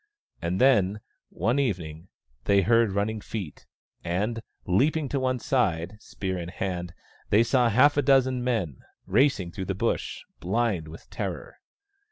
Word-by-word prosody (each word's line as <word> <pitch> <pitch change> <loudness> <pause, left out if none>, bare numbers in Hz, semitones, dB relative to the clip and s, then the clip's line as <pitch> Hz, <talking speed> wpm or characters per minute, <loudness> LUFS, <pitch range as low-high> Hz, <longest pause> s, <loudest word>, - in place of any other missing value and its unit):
And 85 +2 -1
then, 105 -6 +4 0.3
one 115 +10 0
evening, 85 - -2 0.4
they 100 -1 +4
heard 115 0 +3
running 105 +2 -1
feet, 100 -8 -7 0.4
and, 105 +7 -1 0.2
leaping 145 - +2
to 140 - -1
one 130 -1 0
side, 105 -7 0
spear 95 -2 -4
in 85 0 -5
hand, 90 -2 -4 0.3
they 105 +3 +5
saw 120 0 +3
half 130 +6 +5
a - - +5
dozen 130 -3 +3
men, 105 - -1 0.3
racing 105 -4 +2
through 95 +2 -5
the 95 - -2
Bush, 115 +4 -2 0.2
blind 100 -3 0
with 80 +1 -12
terror. - - -5
105 Hz, 145 wpm, -26 LUFS, 90-125 Hz, 0.4 s, they